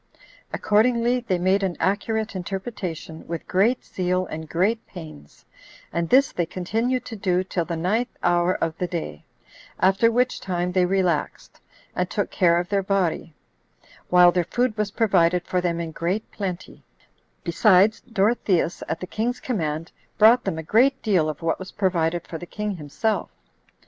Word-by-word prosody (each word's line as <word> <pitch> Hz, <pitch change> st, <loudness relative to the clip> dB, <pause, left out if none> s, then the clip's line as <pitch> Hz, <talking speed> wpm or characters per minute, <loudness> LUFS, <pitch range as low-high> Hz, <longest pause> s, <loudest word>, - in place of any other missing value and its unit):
Accordingly, 235 Hz, +3 st, +2 dB
they 215 Hz, -7 st, -1 dB
made 190 Hz, +3 st, +2 dB
an 190 Hz, -3 st, -2 dB
accurate 215 Hz, +4 st, -1 dB
interpretation, 185 Hz, -4 st, -5 dB
with 170 Hz, -1 st, -5 dB
great 220 Hz, +7 st, +2 dB
zeal 185 Hz, 0 st, -1 dB
and 160 Hz, -2 st, -7 dB
great 210 Hz, +7 st, 0 dB
pains, 155 Hz, -, -12 dB, 0.5 s
and 170 Hz, 0 st, -1 dB
this 270 Hz, +2 st, +5 dB
they 175 Hz, -2 st, -1 dB
continued 225 Hz, +9 st, -1 dB
to 235 Hz, -, -7 dB
do 185 Hz, -3 st, 0 dB
till 180 Hz, -2 st, -2 dB
the 170 Hz, -1 st, -3 dB
ninth 215 Hz, +9 st, -1 dB
hour 175 Hz, +1 st, +2 dB
of 165 Hz, -1 st, -2 dB
the 180 Hz, -, -1 dB
day; 160 Hz, -, -5 dB, 0.5 s
after 195 Hz, +5 st, +4 dB
which 250 Hz, +2 st, +1 dB
time 180 Hz, -1 st, -2 dB
they 180 Hz, -1 st, +2 dB
relaxed, 180 Hz, -5 st, -1 dB, 0.3 s
and 180 Hz, 0 st, -1 dB
took 205 Hz, -, -2 dB
care 170 Hz, -2 st, +3 dB
of 175 Hz, -, -3 dB
their 200 Hz, -1 st, +1 dB
body, 185 Hz, -5 st, -1 dB, 0.7 s
while 180 Hz, 0 st, +7 dB
their 175 Hz, -1 st, 0 dB
food 240 Hz, +5 st, 0 dB
was 210 Hz, -2 st, -1 dB
provided 180 Hz, -5 st, +2 dB
for 180 Hz, -, 0 dB
them 170 Hz, -1 st, -1 dB
in 165 Hz, -1 st, -4 dB
great 180 Hz, +7 st, -3 dB
plenty: 185 Hz, -3 st, -6 dB, 0.6 s
besides, 195 Hz, +5 st, +4 dB
Dorotheus, 195 Hz, -5 st, +1 dB
at 160 Hz, -, -3 dB
the -, -, -3 dB
king's 230 Hz, +6 st, -2 dB
command, 165 Hz, -8 st, -3 dB, 0.3 s
brought 230 Hz, +3 st, +6 dB
them 190 Hz, -5 st, -2 dB
a 160 Hz, -, -4 dB
great 260 Hz, -, +3 dB
deal 180 Hz, -8 st, +2 dB
of 155 Hz, +1 st, -6 dB
what 165 Hz, -, 0 dB
was 190 Hz, 0 st, -8 dB
provided 175 Hz, -3 st, 0 dB
for 165 Hz, -, -7 dB
the 175 Hz, -, -9 dB
king 210 Hz, -1 st, -4 dB
himself. 170 Hz, +9 st, -2 dB
185 Hz, 165 wpm, -24 LUFS, 170-215 Hz, 0.7 s, while